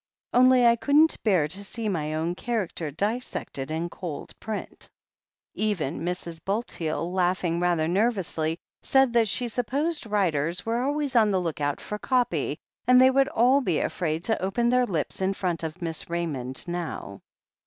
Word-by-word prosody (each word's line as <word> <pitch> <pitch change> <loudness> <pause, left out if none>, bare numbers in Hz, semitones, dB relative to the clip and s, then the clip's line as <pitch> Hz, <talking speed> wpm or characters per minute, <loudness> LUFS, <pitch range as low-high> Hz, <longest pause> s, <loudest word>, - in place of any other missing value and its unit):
Only 255 0 +6
I 235 0 +6
couldn't 295 +6 +3
bear 185 -9 +3
to 190 +6 -7
see 220 +2 -5
my 155 -6 -1
own 165 +2 -1
char 225 +2 -1
acter 160 -2 -5
dissected 205 - -3
in 160 +2 -2
cold 170 -4 -7
print." 220 -1 -6 0.6
Even 185 -9 -1
Mrs. 170 -2 -5
Bulteel, 180 -5 -2
laughing 180 -2 +1
rather 175 -3 +1
nervously, 180 -5 0 0.2
said 265 -2 +3
that 230 -2 +4
she 245 +4 0
supposed 275 +6 -1
writers 175 -5 0
were 230 +2 0
always 285 0 -1
on 220 -3 +5
the 190 -2 +2
look 165 -4 -3
out 145 0 0
for 210 - -6
copy, 250 0 0 0.3
and 250 0 +7
they 260 +1 +7
would 270 +1 +3
all 265 0 +4
be 180 - 0
afraid 160 -2 -1
to 220 +2 0
open 235 +6 +1
their 250 0 +3
lips 165 -1 -3
in 190 +1 +1
front 180 -4 -1
of 165 +2 -5
Miss 165 -1 -3
Raymond 145 -7 -3
now. 170 - -5
190 Hz, 165 wpm, -26 LUFS, 165-240 Hz, 0.6 s, and